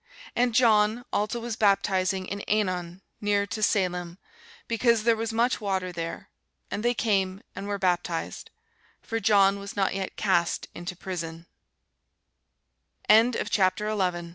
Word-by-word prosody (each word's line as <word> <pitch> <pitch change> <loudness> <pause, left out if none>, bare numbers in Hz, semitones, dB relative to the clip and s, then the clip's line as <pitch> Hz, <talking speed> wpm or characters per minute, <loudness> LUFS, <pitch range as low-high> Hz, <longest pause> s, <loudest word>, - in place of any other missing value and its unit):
And 240 -1 +1
John 225 -1 +4
also 210 +3 0
was 235 -1 -4
baptizing 195 -3 +1
in 200 +2 -5
Ænon 185 -4 -1 0.2
near 205 -1 +1
to 200 +2 -5
Salim, 180 -4 0 0.5
because 230 -1 +2
there 230 0 +4
was 225 0 -3
much 235 +2 +1
water 190 -3 -1
there: 165 -1 -5 0.4
and 205 - -2
they 240 0 +2
came, 195 -4 0
and 195 +1 -6
were 205 0 -2
baptized. 175 -3 -2 0.5
For 225 -1 -2
John 200 -3 +4
was 200 0 -8
not 195 -1 +1
yet 190 -1 -4
cast 180 -4 +1
into 175 +1 -6
prison. 170 -3 -6
200 Hz, 125 wpm, -26 LUFS, 185-220 Hz, 0.5 s, John